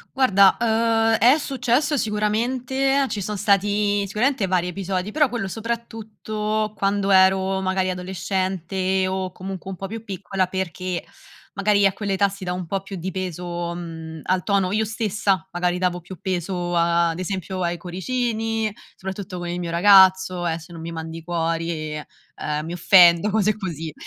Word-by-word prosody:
Guarda, 200 Hz, -7 st, +5 dB
uhm, 225 Hz, 0 st, +2 dB
è 255 Hz, +6 st, +6 dB
successo 275 Hz, +1 st, 0 dB
sicuramente, 250 Hz, +5 st, 0 dB
ci 205 Hz, -, -3 dB
son 210 Hz, +2 st, -3 dB
stati 205 Hz, 0 st, +2 dB
sicuramente 215 Hz, +1 st, 0 dB
vari 180 Hz, -1 st, +1 dB
episodi, 190 Hz, +2 st, -3 dB
però 295 Hz, -4 st, +3 dB
quello 230 Hz, -5 st, -3 dB
soprattutto 215 Hz, -1 st, -3 dB
quando 200 Hz, 0 st, 0 dB
ero 190 Hz, 0 st, +4 dB
magari 185 Hz, 0 st, 0 dB
adolescente, 185 Hz, +1 st, -1 dB
o 185 Hz, -1 st, -2 dB
comunque 190 Hz, 0 st, -7 dB
un 185 Hz, -, -6 dB
po' 195 Hz, -, -5 dB
più 225 Hz, +2 st, -7 dB
piccola, 190 Hz, -2 st, -2 dB
perché 185 Hz, -1 st, -3 dB, 0.5 s
magari 200 Hz, 0 st, +2 dB
a 195 Hz, -, +3 dB
quella 200 Hz, -1 st, -3 dB
età 200 Hz, +1 st, +3 dB
si 195 Hz, 0 st, -8 dB
da 180 Hz, 0 st, -2 dB
un 180 Hz, -1 st, -4 dB
po' 195 Hz, +3 st, -2 dB
più 195 Hz, 0 st, -8 dB
di 185 Hz, +3 st, -4 dB
peso, 175 Hz, -2 st, -4 dB
mhmm, 160 Hz, -2 st, -7 dB
al 185 Hz, -1 st, 0 dB
tono 195 Hz, -2 st, +1 dB
io 215 Hz, +1 st, +1 dB
stessa 210 Hz, -4 st, -1 dB
magari 175 Hz, 0 st, 0 dB
davo 180 Hz, -1 st, -1 dB
più 175 Hz, 0 st, -11 dB
peso, 180 Hz, -2 st, -2 dB
ad 170 Hz, 0 st, +2 dB
esempio, 185 Hz, 0 st, -4 dB
ai 175 Hz, 0 st, -1 dB
cuoricini, 225 Hz, +3 st, -2 dB, 0.2 s
soprattutto 190 Hz, -1 st, -6 dB
con 175 Hz, 0 st, -5 dB
il 175 Hz, +1 st, -3 dB
mio 170 Hz, -1 st, -4 dB
ragazzo: 190 Hz, -1 st, +5 dB
"Eh 165 Hz, 0 st, -1 dB
se 165 Hz, +2 st, -14 dB
non 165 Hz, -, -8 dB
mi 165 Hz, +1 st, -6 dB
mandi 165 Hz, 0 st, -6 dB
i -, -, -15 dB
cuori, 165 Hz, -2 st, -2 dB
ehm, 150 Hz, 0 st, -6 dB
mi 170 Hz, -, -5 dB
offendo." 175 Hz, +2 st, +6 dB
Cose 215 Hz, 0 st, +2 dB
così 165 Hz, -6 st, -5 dB
190 Hz, 165 wpm, -23 LUFS, 175-210 Hz, 0.5 s, è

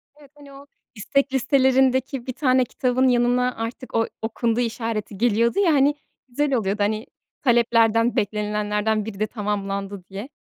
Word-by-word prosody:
Evet, 290 Hz, -2 st, -19 dB
hani, 285 Hz, -1 st, -15 dB
o 275 Hz, +1 st, -13 dB, 0.3 s
istek 275 Hz, +6 st, 0 dB
listelerindeki 265 Hz, -1 st, +2 dB
bir 255 Hz, -, -3 dB
tane 255 Hz, -1 st, +2 dB
kitabın 255 Hz, +1 st, 0 dB
yanına 250 Hz, 0 st, +2 dB
artık 230 Hz, +3 st, -6 dB
o 225 Hz, 0 st, +2 dB
"okundu" 225 Hz, +1 st, -1 dB
işareti 225 Hz, -3 st, -3 dB
geliyordu 235 Hz, -, +2 dB
ya, 360 Hz, -5 st, +4 dB
hani, 285 Hz, +1 st, +3 dB, 0.3 s
güzel 275 Hz, +3 st, -1 dB
oluyordu. 205 Hz, -3 st, 0 dB
Hani, 215 Hz, +2 st, -1 dB, 0.4 s
taleplerden, 230 Hz, -1 st, +3 dB
beklenilenlerden 210 Hz, +1 st, -1 dB
biri 205 Hz, -3 st, -7 dB
de 215 Hz, -, 0 dB
tamamlandı 200 Hz, -2 st, -4 dB
diye. 200 Hz, +7 st, -7 dB
235 Hz, 145 wpm, -23 LUFS, 210-260 Hz, 0.4 s, ya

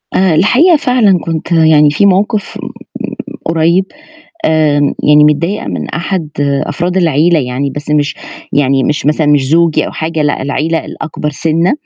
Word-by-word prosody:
أنا 185 Hz, -4 st, +2 dB
الحقيقة 255 Hz, -, +4 dB
فعلًا 240 Hz, -, +2 dB
كنت 165 Hz, +1 st, -5 dB
يعني 160 Hz, -2 st, +4 dB
في 200 Hz, +7 st, +1 dB
موقِف 200 Hz, +2 st, 0 dB
م -, -, -8 dB
م -, -, -10 dB, 0.7 s
قريّب 165 Hz, +3 st, +1 dB, 0.6 s
آمم، 150 Hz, -2 st, +1 dB
يعني 150 Hz, 0 st, +5 dB
متضايقة 165 Hz, +7 st, 0 dB
من -, -, -4 dB
أحد 170 Hz, -1 st, -3 dB, 0.4 s
أفراد 175 Hz, +5 st, -3 dB
العيلة 165 Hz, -1 st, +2 dB
يعني، 135 Hz, +1 st, -2 dB
بس 145 Hz, +2 st, -7 dB
مش 150 Hz, -1 st, 0 dB, 0.4 s
يعني 135 Hz, -2 st, +1 dB
مش 150 Hz, -1 st, -1 dB
مثلًا 150 Hz, 0 st, +1 dB
مش 145 Hz, -2 st, +3 dB
زوجي 165 Hz, 0 st, +2 dB
أو -, -, -7 dB
حاجة 160 Hz, -1 st, -3 dB
لأ، 145 Hz, -2 st, -1 dB
العيلة 155 Hz, +4 st, -2 dB
الأكبر 150 Hz, -1 st, -5 dB
سِنّة 165 Hz, +4 st, 0 dB
160 Hz, 155 wpm, -12 LUFS, 150-175 Hz, 0.7 s, يعني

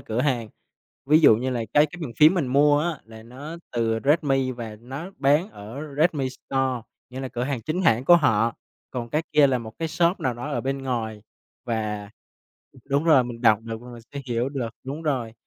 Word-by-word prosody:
cửa 110 Hz, +2 st, -2 dB
hàng. 125 Hz, -5 st, 0 dB, 0.6 s
Ví 155 Hz, +3 st, +6 dB
dụ 140 Hz, -8 st, +7 dB
như 130 Hz, +3 st, -2 dB
là 120 Hz, -3 st, -2 dB
cái 150 Hz, +1 st, +6 dB
cái 175 Hz, +4 st, -11 dB
bàn 135 Hz, -7 st, -5 dB
phím 155 Hz, +7 st, +7 dB
mình 165 Hz, -8 st, 0 dB
mua 145 Hz, +3 st, +4 dB
á 165 Hz, 0 st, -2 dB
là 110 Hz, 0 st, -13 dB
nó 135 Hz, +8 st, -9 dB, 0.2 s
từ 115 Hz, -2 st, 0 dB
Redmi 135 Hz, -3 st, +2 dB
và 115 Hz, -3 st, -7 dB
nó 135 Hz, +10 st, -7 dB
bán 145 Hz, +8 st, +3 dB
ở 110 Hz, -, -8 dB
Redmi 150 Hz, -4 st, +2 dB
Store, 130 Hz, -2 st, -2 dB, 0.3 s
nghĩa 130 Hz, -, -6 dB
là 130 Hz, -, -4 dB
cửa 120 Hz, 0 st, -3 dB
hàng 135 Hz, -3 st, -2 dB
chính 165 Hz, +8 st, -2 dB
hãng 115 Hz, -5 st, +3 dB
của 175 Hz, +4 st, +8 dB
họ, 115 Hz, -7 st, +2 dB, 0.4 s
còn 120 Hz, -2 st, -4 dB
cái 155 Hz, -, 0 dB
kia 150 Hz, -2 st, +6 dB
là 130 Hz, -2 st, +1 dB
một 110 Hz, -2 st, -8 dB
cái 165 Hz, -, -2 dB
shop 170 Hz, +3 st, +1 dB
nào 125 Hz, -2 st, 0 dB
đó 120 Hz, +5 st, -6 dB
ở -, -, -1 dB
bên 135 Hz, +1 st, -2 dB
ngoài 110 Hz, -5 st, -3 dB, 0.4 s
và 105 Hz, -3 st, -3 dB, 0.8 s
đúng 140 Hz, +3 st, +2 dB
rồi, 150 Hz, -7 st, +5 dB
mình 120 Hz, -1 st, -7 dB
đọc 110 Hz, -2 st, +5 dB
được 115 Hz, 0 st, -6 dB
và 125 Hz, -, -11 dB
mình 120 Hz, -1 st, -11 dB
sẽ 140 Hz, -, -3 dB
hiểu 120 Hz, +1 st, 0 dB
được, 135 Hz, -4 st, -3 dB, 0.2 s
đúng 145 Hz, +5 st, -5 dB
rồi. 130 Hz, -7 st, -1 dB
130 Hz, 215 wpm, -24 LUFS, 115-150 Hz, 0.8 s, của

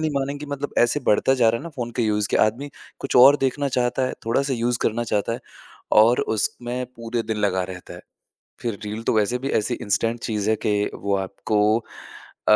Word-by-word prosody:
नहीं 155 Hz, 0 st, 0 dB
मानेंगे 140 Hz, +2 st, -3 dB
मतलब 145 Hz, +1 st, -6 dB
ऐसे 120 Hz, +5 st, +3 dB
बढ़ता 105 Hz, +5 st, +3 dB
जा 115 Hz, -, +6 dB
रहा 115 Hz, +1 st, +1 dB
है -, -, -10 dB
ना -, -, -5 dB
फ़ोन 120 Hz, -2 st, -3 dB
के -, -, +3 dB
यूज़ 105 Hz, -2 st, 0 dB
के -, -, +2 dB
आदमी 130 Hz, +7 st, -4 dB, 0.3 s
कुछ 135 Hz, -, -1 dB
और 135 Hz, +4 st, +8 dB
देखना 140 Hz, +2 st, -1 dB
चाहता 125 Hz, +1 st, +1 dB
है, -, -, -3 dB
थोड़ा-सा 135 Hz, +4 st, +1 dB
यूज़ 120 Hz, 0 st, 0 dB
करना 115 Hz, +1 st, 0 dB
चाहता 105 Hz, +2 st, +1 dB
है 120 Hz, -, -5 dB, 0.6 s
और 120 Hz, +3 st, +4 dB, 0.2 s
उसमें 125 Hz, +3 st, -2 dB
पूरे 115 Hz, 0 st, -3 dB
दिन -, -, -3 dB
लगा 95 Hz, -3 st, +1 dB
रहता 90 Hz, -1 st, -10 dB
है। -, -, -10 dB, 0.6 s
फ़िर 115 Hz, -4 st, -3 dB
रील 105 Hz, +2 st, -5 dB
तो -, -, +1 dB
वैसे 110 Hz, +4 st, +1 dB
भी 135 Hz, +2 st, -4 dB
ऐसी 110 Hz, +4 st, -2 dB
इंस्टेंट 115 Hz, +3 st, 0 dB
चीज़ 105 Hz, -2 st, -1 dB
है 110 Hz, -, +2 dB
कि 105 Hz, -1 st, +1 dB
वो 100 Hz, 0 st, -1 dB
आपको 100 Hz, +2 st, -2 dB, 0.9 s
अ, 105 Hz, -, +8 dB
115 Hz, 210 wpm, -23 LUFS, 105-125 Hz, 0.9 s, और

